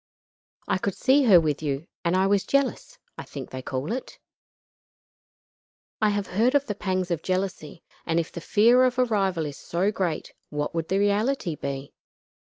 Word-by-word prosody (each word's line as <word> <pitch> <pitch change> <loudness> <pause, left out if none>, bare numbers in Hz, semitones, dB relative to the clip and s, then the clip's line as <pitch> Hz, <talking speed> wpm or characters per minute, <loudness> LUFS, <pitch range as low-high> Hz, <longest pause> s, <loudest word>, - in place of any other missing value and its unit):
I 190 - +1
could 195 0 -2
see 275 +1 +3
her 195 -7 +8
with 155 -3 -1
you, 145 0 -2 0.2
and 170 +1 +1
I 190 - +3
was 200 0 +2
jealous 275 - -1 0.2
I - - -5
think - - -8
they 130 - -5
call 130 +5 -4
it. 255 +3 -5 1.8
I 215 - +4
have 205 -1 -1
heard 230 +9 +1
of 280 -1 +3
the 210 - -2
pangs 185 -2 -2
of 165 -2 -1
jealousy, 185 -4 -3 0.2
and 165 0 +1
if 165 - -3
the 170 - -7
fear 235 +8 +4
of 250 -1 +2
a 255 - +4
rival 195 -7 0
is 145 -2 -6
so 185 +4 -1
great 180 -6 -3 0.2
what 150 +1 -3
would 165 -1 -2
the 190 - +1
reality 205 0 +1
be? 140 -1 -5
190 Hz, 185 wpm, -25 LUFS, 165-215 Hz, 1.8 s, her